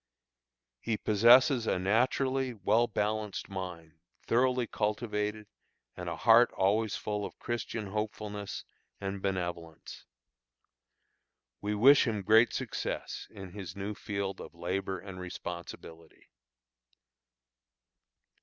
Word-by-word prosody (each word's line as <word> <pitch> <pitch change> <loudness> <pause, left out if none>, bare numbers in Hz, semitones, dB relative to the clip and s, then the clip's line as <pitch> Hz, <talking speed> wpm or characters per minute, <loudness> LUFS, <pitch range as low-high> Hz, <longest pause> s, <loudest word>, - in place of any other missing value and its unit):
He 115 -2 -1
possesses 120 +4 +5
a - - +2
naturally 130 +6 +1
well 110 +4 +2
balanced 105 -1 -2
mind, 85 -4 -7 0.3
thoroughly 125 +1 +2
cultivated, 105 -1 -2 0.5
and - - -5
a - - -3
heart 115 +2 +6
always 105 +3 +1
full 105 -1 -3
of - - -7
Christian 115 -2 -4
hopefulness 105 -1 -4 0.3
and 95 0 -4
benevolence. 85 -4 -4 1.5
We 105 +1 -1
wish 135 +6 +6
him 105 -3 -1
great 110 +4 +5
success - - -4
in 95 -2 -10
his 95 -3 -7
new 100 +2 -4
field 100 -1 -4
of - - -10
labor 95 +3 -2
and 90 +1 -9
responsibility. 85 -2 -8
105 Hz, 105 wpm, -31 LUFS, 95-115 Hz, 1.5 s, heart